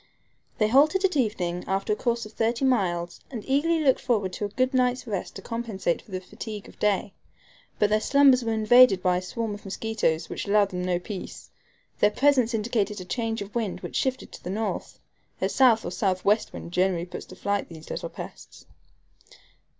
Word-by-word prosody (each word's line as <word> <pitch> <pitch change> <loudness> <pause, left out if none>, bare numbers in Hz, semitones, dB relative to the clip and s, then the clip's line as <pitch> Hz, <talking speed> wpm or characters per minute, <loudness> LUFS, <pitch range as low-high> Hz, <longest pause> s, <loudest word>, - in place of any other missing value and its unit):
They 215 - +3
halted 305 - +4
at 370 - +1
evening 180 -9 -1
after 195 +2 0
a - - 0
course 235 0 -1
of 215 - -12
thirty 230 +4 0
miles 175 -9 0
and 235 -6 -6
eagerly 315 +5 +2
looked 265 -3 +4
forward 205 -7 0
to 210 - -3
a - - -4
good 255 +5 0
night's 250 0 +1
rest 200 -6 -4
to 195 - -8
compensate 225 -7 -2
for - - -23
the 185 -1 -3
fatigue 205 +3 -8
of - - -16
day. 205 -1 +1 0.6
But 210 0 +2
their 215 0 +3
slumbers 275 -2 +5
were 225 - -1
invaded 220 -2 +6
by 180 -1 +3
a - - -2
swarm 220 +4 -4
of 205 - -9
mosquitoes, 195 -5 -1
which - - -5
allowed 200 0 +4
them 180 -1 -4
no 180 -1 +1
peace. 185 +2 -8 0.5
Their 210 - +5
presence 255 0 +3
indicated 215 -2 -1
a 185 - -7
change 225 +1 -2
of 200 - -13
wind 225 -5 -2
which - - -7
shifted 260 -1 -1
to - - -12
the - - -5
north. 215 +3 -3 0.4
A - - +1
south 245 -4 +4
or - - -3
southwest 200 +2 +1
wind 170 - -8
generally 180 -1 +1
puts 180 - -8
to 185 - -11
flight 200 +1 -2
these 160 -2 -10
little - - -4
pests. - - -10
215 Hz, 195 wpm, -26 LUFS, 190-245 Hz, 0.6 s, invaded